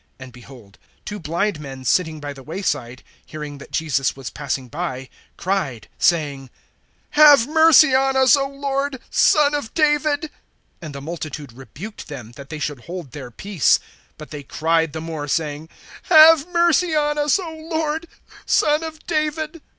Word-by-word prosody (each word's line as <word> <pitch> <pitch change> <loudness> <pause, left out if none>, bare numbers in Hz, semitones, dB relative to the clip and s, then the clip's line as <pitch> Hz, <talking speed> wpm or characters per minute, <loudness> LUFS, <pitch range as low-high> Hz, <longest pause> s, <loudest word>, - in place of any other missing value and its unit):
(30)And 130 -1 -10
behold, 120 -4 -15 0.3
two 205 0 -6
blind 170 +3 -2
men 135 -3 -9
sitting 160 +2 +1
by 145 -1 -6
the 135 - -13
way 165 +9 -7
side, 130 -7 -3 0.2
hearing 150 -2 -8
that - - -12
Jesus 140 -4 -1
was 135 -4 -7
passing 135 -3 -4
by, 135 -3 -5 0.3
cried, 160 - -2
saying: 145 -6 0 0.6
Have 290 -5 +7
mercy 315 -2 +6
on 270 0 +2
us, 260 -1 +6
O 275 -1 -1
Lord, 275 -1 -3
Son 295 -1 +4
of 290 -6 -3
David. 300 0 +1 0.5
(31)And 155 -3 -8
the 140 - -7
multitude 150 -4 -7
rebuked 155 - -10
them, 125 -7 -9
that 140 +3 -12
they 155 - -6
should 145 -4 -5
hold 170 -6 -7
their 130 -2 -8
peace. 185 - +1 0.4
But 155 - -11
they 150 -1 -6
cried 160 +2 0
the 160 - -5
more, 160 -3 -5
saying: 150 +1 -2 0.4
Have 320 -2 +8
mercy 345 -1 +2
on 295 0 +1
us, 295 -2 +3
O 335 -4 -6
Lord, 320 0 -2 0.4
Son 300 +1 +2
of 320 -1 -8
David. 310 0 -2
170 Hz, 160 wpm, -21 LUFS, -, 0.6 s, Have